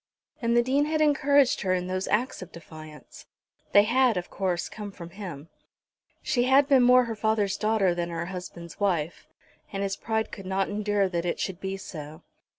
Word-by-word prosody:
And 235 0 +2
the 240 - +5
Dean 275 +4 +2
had 310 +1 -1
encouraged 285 -3 +3
her 185 -2 +1
in 180 -1 -2
those 185 +1 -3
acts 235 +1 0
of 185 - -9
defiance. 155 -3 -12 0.4
They 205 - +7
had, 240 0 +3
of 180 - -5
course, 185 -3 -1
come 210 -2 -8
from 170 -3 -10
him. 170 -6 -8 0.7
She 245 -5 +1
had 270 +2 +5
been 270 -3 +5
more 250 +1 +6
her 230 -1 -4
father's 215 -2 0
daughter 210 -4 +1
than 175 0 -3
her 170 0 -4
husband's 175 -2 -8
wife, 175 -5 -1 0.4
and 195 0 -3
his 195 0 -1
pride 220 -1 -2
could 195 -2 -9
not 190 0 0
endure 205 -1 0
that 170 -2 -2
it 175 - -2
should 190 -2 -3
be 195 0 -4
so. 155 -5 -9
195 Hz, 190 wpm, -26 LUFS, 175-235 Hz, 0.7 s, They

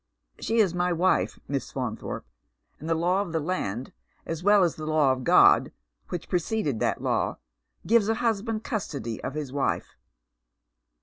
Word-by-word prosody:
She 225 - -1
is 200 -6 +4
my 180 0 0
wife. 180 +2 +1
Miss 140 -1 -3
Fa«nthorpe, - - -4 0.6
and 160 - -6
the 165 - +2
law 180 +4 +1
of 175 -5 -5
the 160 - +1
land, 135 - -3 0.3
as 165 0 -4
well 205 +1 +5
as 170 - +2
the 155 0 -6
law 155 -3 +3
of 130 -1 -2
God - - +6 0.4
which 175 - -5
preceded 175 - -1
that - - -1
law, - - 0 0.5
gives 225 -1 +3
a 225 - +2
hus 225 -3 0
band 225 0 -3
custody 140 - -4
of 135 - -4
his 145 -4 -4
wife." 140 -1 -1
170 Hz, 170 wpm, -26 LUFS, 145-205 Hz, 0.6 s, God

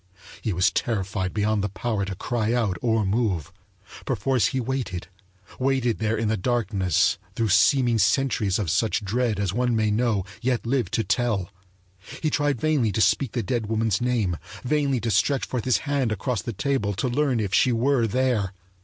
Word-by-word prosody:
He 110 - -1
was 90 +2 +2
terrified 95 -4 -1
beyond 105 -1 0
the 105 - -1
power 105 0 -2
to 95 -1 -5
cry 115 +2 -1
out 110 -6 +1
or 110 -3 +1
move. 95 - -1 0.5
Perforce 130 -3 +1
he 130 - -2
waited 120 -9 -3 0.5
waited 130 -3 +1
there 110 0 0
in 110 0 0
the 110 - +1
darkness 100 - +1 0.2
through 115 -2 0
seeming 115 +4 +4
centuries 105 -2 +2
of 95 -8 -1
such 105 +2 0
dread 115 0 0
as 100 -2 -1
one 120 +1 +1
may 110 -1 +1
know, 105 -3 +1 0.2
yet 125 -1 0
live 125 +1 0
to 115 - 0
tell. 105 -3 0 0.7
He 155 - -1
tried 145 -3 +1
vainly 145 -7 +1
to - - -1
speak 110 +5 +2
the 120 - -1
dead 115 +2 -2
woman's 110 -1 0
name, 115 -9 0 0.3
vainly 140 -1 +1
to 115 +1 -1
stretch 135 +7 +2
forth 125 -4 -4
his 125 -3 +3
hand 140 -5 0
across 110 +1 -2
the 120 - -4
table 105 -2 -1
to 130 - -1
learn 130 -1 +1
if 100 -3 -2
she 130 - +4
were 120 0 +2
there. 115 -4 0
115 Hz, 180 wpm, -24 LUFS, 100-125 Hz, 0.7 s, seeming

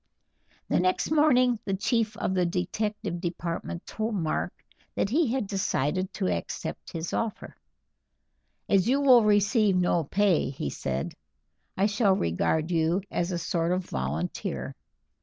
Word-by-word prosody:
The - - +2
next 185 - +1
morning 255 -6 +4
the 195 - -1
chief 220 +1 0
of 190 - -1
the 185 -1 +2
detective 185 +1 -2
department 170 -1 -4
told 220 0 -3
Mark 160 -5 -1 0.4
that 200 - 0
he 295 -2 +2
had 260 -3 0
decided 185 -2 -1
to - - -1
accept 85 -2 -4
his 165 0 -4
offer. 225 -2 -3 1.1
"As 195 +2 +3
you 275 +2 +3
will 255 -5 +6
receive 205 0 +3
no 175 -2 +2
pay," 195 +3 +2
he 75 - -4
said, 65 +1 -3 0.6
"I 195 - +3
shall 205 -2 +3
regard 155 - 0
you 170 +3 +1
as 175 +1 -1
a 175 - -1
sort 170 0 -1
of 185 0 0
volunteer. 70 +7 -3
185 Hz, 140 wpm, -27 LUFS, 170-215 Hz, 1.1 s, will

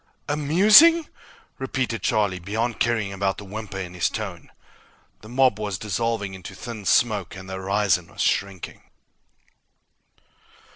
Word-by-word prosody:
"Amusing?" 205 - +6 0.5
repeated 130 -4 -2
Charlie, 100 -2 0
beyond 110 +6 -3
caring 110 -5 0
about 95 0 -1
the 105 - -9
whimper 105 0 -7
in 90 -2 -6
his 90 - 0
tone. - - -6 0.7
The 110 - -13
mob 125 -3 +2
was 105 -4 -3
dissolving 110 0 -2
into 95 +1 -9
thin 105 +2 -8
smoke, 95 +3 +1
and 95 0 -10
the 95 - -7
horizon 95 0 0
was - - -7
shrinking. 100 -3 -2
105 Hz, 130 wpm, -23 LUFS, 95-120 Hz, 0.7 s, Amusing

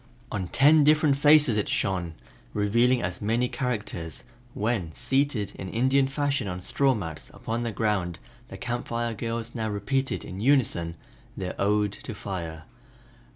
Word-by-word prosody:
On 95 -3 -2
ten 150 - +5
different 150 -1 +4
faces 145 -4 +5
it 105 - 0
shone, 90 -4 -1 0.4
revealing 120 +5 +3
as 90 -1 -3
many 115 +4 +1
characters 105 - -3 0.3
when, 105 -6 -1
seated 125 -5 0
in 95 - -5
Indian 130 +5 +3
fashion 140 -4 -1
on 90 -1 -5
straw 135 +4 +2
mats 80 -7 -6
upon 115 +1 -3
the 120 -1 -2
ground, 100 -6 -1 0.3
the - - -9
Camp 120 0 -3
Fire 115 0 -1
girls 115 +1 -4
now 110 -2 -2
repeated 130 +7 -1
in 95 - -7
unison 110 -11 +2 0.4
their 90 -1 -3
"Ode 105 0 +2
to 115 - -7
Fire." 85 -6 -5
115 Hz, 150 wpm, -27 LUFS, 95-130 Hz, 0.4 s, ten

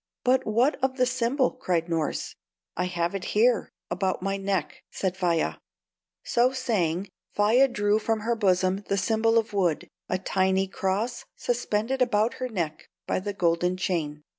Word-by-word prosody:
"But 260 +1 +2
what 245 +7 +2
of 265 0 +1
the 255 - +4
symbol?" 255 +1 +1
cried 170 -2 -1
Norss. 165 -3 -2 0.4
"I 180 - 0
have 175 -1 -1
it 195 -2 -3
here, 235 +2 +3 0.2
about 190 -2 -1
my 195 +1 0
neck," 195 0 -2
said 190 -2 -2
Faia. 175 -3 0 0.7
So 245 +2 +3
saying, 200 -8 -1 0.3
Faia 225 +6 +5
drew 205 -4 +1
from 220 0 -1
her 235 +2 0
bosom 185 -3 +2
the 200 - 0
symbol 225 +3 +2
of 225 -2 0
wood, 180 -6 +1 0.2
a 185 - +1
tiny 190 0 +1
cross 200 +6 -2
suspended 240 +1 -1
about 225 -2 +2
her 255 - -1
neck 165 -8 -4 0.2
by - - 0
the 205 +2 -3
golden 180 0 +1
chain. 155 -5 -2
200 Hz, 160 wpm, -26 LUFS, 180-235 Hz, 0.7 s, Faia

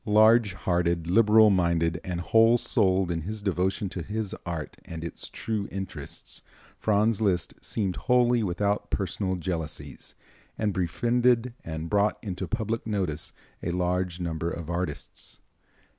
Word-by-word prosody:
Large 110 0 +5
hearted, 85 -2 0
liberal 110 0 +6
minded, 85 -2 +1
whole 110 +7 +4
souled 95 -6 +1
in 85 -1 -1
his 105 +5 -5
devotion 95 +1 0
to 90 - -5
his 105 +4 -3
art 80 -3 -4
and 80 -1 -7
its 85 - -5
true 110 -3 -3
interests, 95 -1 -6 0.4
Franz 110 +1 +2
Liszt 95 -5 +1
seemed 95 -5 -1
wholly 125 -1 +3
without 100 +1 0
personal 95 0 -1
jealousies, 85 -3 -5 0.4
and 105 -2 0
befriended 120 +6 +2
and 80 0 -5
brought 105 +3 +2
into 95 -3 -4
public 115 0 -2
notice 90 -8 -1 0.3
a - - -2
large 90 0 -1
number 85 -1 -2
of 85 -1 -5
artists. 85 -4 -5
95 Hz, 130 wpm, -27 LUFS, 85-110 Hz, 0.4 s, liberal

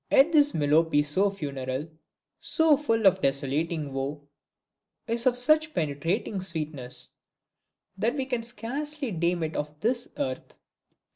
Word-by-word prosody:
Yet 280 +5 +6
this 295 -2 +5
Melopee 150 0 +3
so 190 +8 +2
funereal, 140 -6 -4 0.5
so 320 -2 +4
full 225 -7 0
of 190 0 +5
desolating 140 +2 -1
woe, 140 +2 -4 0.8
is 235 +2 -1
of 245 -1 +3
such 310 +3 +2
penetrating 165 +7 -1
sweetness, 155 -8 -4 0.9
that 230 +5 +1
we 270 -2 -1
can 250 -3 -1
scarcely 265 +5 -3
deem 170 -1 0
it 160 0 -3
of 150 0 -4
this 240 +2 0
earth. 130 -1 -4
180 Hz, 130 wpm, -27 LUFS, 145-245 Hz, 0.9 s, Yet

